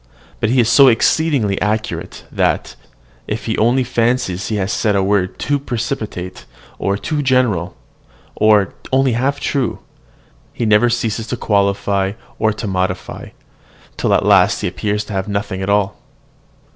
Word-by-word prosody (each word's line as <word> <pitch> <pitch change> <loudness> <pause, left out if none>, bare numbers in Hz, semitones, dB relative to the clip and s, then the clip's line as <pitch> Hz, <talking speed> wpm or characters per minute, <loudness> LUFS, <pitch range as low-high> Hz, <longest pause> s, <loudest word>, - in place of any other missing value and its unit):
But 110 - 0
he 125 +2 +2
is 115 - +4
so 135 +3 +7
exceedingly 125 -3 +2
accurate, 105 +1 -3
that, - - 0 0.5
if 105 0 -4
he 110 - -1
only 120 +4 +3
fancies 120 -6 0
he 110 - -2
has 95 -1 -1
said 105 -3 +1
a 100 - +2
word 95 -1 0
too 145 0 0
precipitate, 115 -8 -4 0.3
or 100 0 0
too 150 +9 -2
general, 125 -10 +1 0.6
or 105 -2 +3 0.2
only 135 0 +3
half 130 +5 0
true, 135 -5 -1 0.8
he 120 - -2
never 110 +3 +4
ceases 115 -1 -2
to 125 - -3
qualify, 100 -2 +1
to 110 0 -3
modify, 95 -1 -2
and - - -10
extenuate, - - -30
till - - +1
at - - +1
last - - +4
he - - -1
appears 105 0 -2
to - - -7
have 95 -1 -1
said 105 - -6
nothing 100 -1 -3
at 95 - -2
all. 100 -1 +1
110 Hz, 160 wpm, -18 LUFS, 100-125 Hz, 0.8 s, so